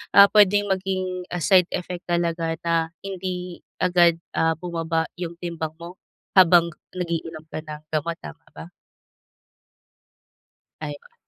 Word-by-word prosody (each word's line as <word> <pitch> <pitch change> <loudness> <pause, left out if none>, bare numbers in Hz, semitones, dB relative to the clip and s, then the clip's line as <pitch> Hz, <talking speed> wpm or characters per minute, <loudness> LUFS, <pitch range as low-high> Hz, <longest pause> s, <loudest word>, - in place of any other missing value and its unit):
Ah, 200 - +11
puwedeng 205 -1 +5
maging, 185 -1 -2
ah, 180 - -3
side 180 +1 +5
effect 180 0 -5
talaga 170 -1 0
na 170 - +1 0.3
hindi 180 -2 -5 0.2
agad, 175 -2 +4 0.2
ah, 160 0 +2
bumaba 165 -1 -1
yung 170 -1 -4
timbang 165 -3 -4
mo 170 +2 -10 0.4
habang 175 -2 +6 0.2
nag-iinom 165 -3 -4
ka - - -4
ng 155 -1 -8
gamot, 160 +2 -1
tama 75 - -10
ba? 80 +3 -9 2.1
Ayon. 145 -1 -7
170 Hz, 120 wpm, -24 LUFS, 165-180 Hz, 2.1 s, Ah